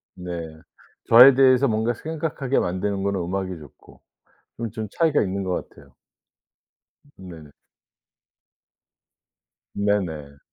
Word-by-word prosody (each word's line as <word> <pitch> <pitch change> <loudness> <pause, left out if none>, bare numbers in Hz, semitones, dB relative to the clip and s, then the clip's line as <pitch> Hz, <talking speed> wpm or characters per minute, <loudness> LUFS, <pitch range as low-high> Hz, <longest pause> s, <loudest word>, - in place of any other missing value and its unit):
네. 85 -3 -8 0.5
저에 125 +4 +9
대해서 130 +1 +4
뭔가 110 +1 0
생각하게 150 -1 -3
만드는 95 +2 -2
거는 100 -1 -1
음악이 95 +1 -4
좋고 75 -4 -17 0.6
그건 115 -1 -5
좀 110 -2 -6
차이가 160 +1 +1
있는 100 0 -3
것 90 -1 -3
같아요. - - -20 1.2
네네. 85 -6 -12 2.2
네네. 80 -9 -3
100 Hz, 215 characters per minute, -23 LUFS, 90-120 Hz, 2.2 s, 저에